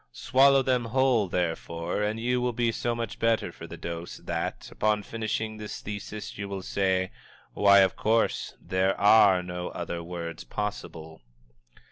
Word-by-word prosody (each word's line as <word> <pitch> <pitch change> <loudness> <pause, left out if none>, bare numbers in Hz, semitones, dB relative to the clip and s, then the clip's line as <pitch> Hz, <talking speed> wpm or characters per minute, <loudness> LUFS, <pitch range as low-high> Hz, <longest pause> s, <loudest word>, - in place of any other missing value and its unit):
Swallow 135 - +4
them 125 -2 +1
whole, 125 -3 +2
therefore, 85 +1 -2
and 105 +2 -1
you 125 +2 0
will 125 0 0
be 120 0 +1
so 120 +1 -2
much 115 -2 -5
better 115 -1 +1
for - - -10
the - - -9
dose 85 0 -6
that, - - -4
upon 105 -1 +1
finishing 110 0 -3
this 105 -1 -6
thesis 105 0 -7
you 100 -1 -4
will 95 -1 -5
say, 95 -1 0 0.4
"Why, 100 -1 +6
of 95 - +3
course 115 +1 0
there 95 +1 0
are 100 -3 +6
no 90 0 -5
other 85 0 -5
words 85 -1 -6
possible!" 80 -7 -6
105 Hz, 155 wpm, -27 LUFS, 90-115 Hz, 0.4 s, Why